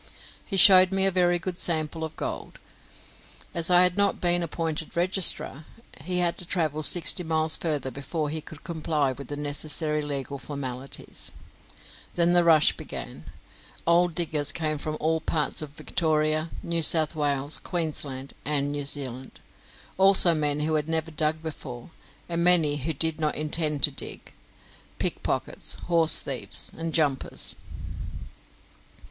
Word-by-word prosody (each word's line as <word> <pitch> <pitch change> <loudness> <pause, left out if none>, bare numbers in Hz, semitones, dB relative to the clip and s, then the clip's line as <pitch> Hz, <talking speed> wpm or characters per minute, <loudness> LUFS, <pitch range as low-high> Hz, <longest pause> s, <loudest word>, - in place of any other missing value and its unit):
He 195 - -4
showed 185 -1 +8
me 195 0 +1
a 195 - +3
very 175 -1 +2
good 175 +1 -5
sample 160 -2 +1
of 160 0 -6
gold. - - -6 1.0
As 170 0 0
I 180 0 +6
had 180 +1 +2
not 200 -1 +1
then 175 - +4
been 175 0 +2
appointed 165 -1 -4
registrar, 175 -4 +1 0.4
he 180 +2 -2
had 175 -1 0
to 180 - -1
travel 155 -4 -1
sixty 175 +3 +4
miles 160 -1 +1
further 145 -5 -2
before 145 +4 -4
he 160 0 -4
could 155 0 -13
comply 155 -4 -2
with 135 0 -9
the 145 - -6
necessary 150 +1 +1
legal 140 -1 -5
formalities. 135 -1 -5 0.8
Then 170 0 +3
the 175 0 +4
rush 160 -2 +4
began. - - -8 0.6
Old 170 0 +2
diggers 150 -4 +1
came 155 -2 -3
from 155 +1 -4
all 160 +1 -1
parts 155 -1 -1
of 155 - -7
Victoria, 155 +1 -1
New 170 0 -1
South 160 0 +4
Wales, 145 -1 +1
Queensland, 145 -6 -4
and 145 -1 -1
New 145 -1 -4
Zealand; 130 -2 -5 0.6
also 190 -3 +8
men 150 -2 0
who 155 +1 -1
had 155 0 -1
never 160 0 -2
dug 155 +1 -2
before, 135 -4 -8 0.4
and 170 0 -2
many 165 -5 +5
who 145 +4 -3
did 160 +2 0
not 155 -1 -1
intend 150 -1 -1
to 150 - +6
dig 135 - -7 0.6
pickpockets, - - -2
horse 165 -3 +1
thieves, 135 -4 -2
and 165 0 -5
jumpers. 145 -5 -1
155 Hz, 150 wpm, -25 LUFS, 145-170 Hz, 1.0 s, showed